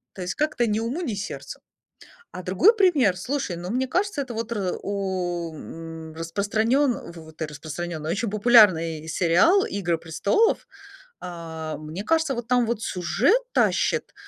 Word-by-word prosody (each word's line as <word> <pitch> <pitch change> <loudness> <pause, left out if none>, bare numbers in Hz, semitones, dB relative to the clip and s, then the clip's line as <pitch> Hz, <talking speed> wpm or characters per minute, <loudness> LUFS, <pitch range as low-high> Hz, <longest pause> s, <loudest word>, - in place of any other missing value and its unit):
То 190 - -7
есть 180 - -3
как-то 295 -6 0
ни 215 +1 0
уму 245 +10 -2
ни 250 -11 -2
сердцу. 200 0 -6 0.7
А 185 - -7
другой 195 - +4
пример, 300 - +4
слушай, 250 0 -3
ну, 175 +1 -6
мне 255 +4 0
кажется, 370 0 0
это 255 -3 -6
вот 230 +1 -4
р 195 -5 -2
у 180 -4 -3
м, 160 0 -9
распространён 215 - 0
фу 160 -2 -12
ты, 160 0 -5
распространённый, 155 +2 -6
очень 220 +3 -1
популярный 185 -8 +4
сериал- 185 - +4
"Игры 175 -4 -1
престолов". 170 - +1 0.5
А, 160 -3 -6
мне 155 +5 -7
кажется, 320 -1 +1
вот 235 -1 -5
там 245 -1 +3
вот 230 -2 -2
сюжет 235 - +2
тащит, - - +1
200 Hz, 150 wpm, -24 LUFS, 165-245 Hz, 0.7 s, другой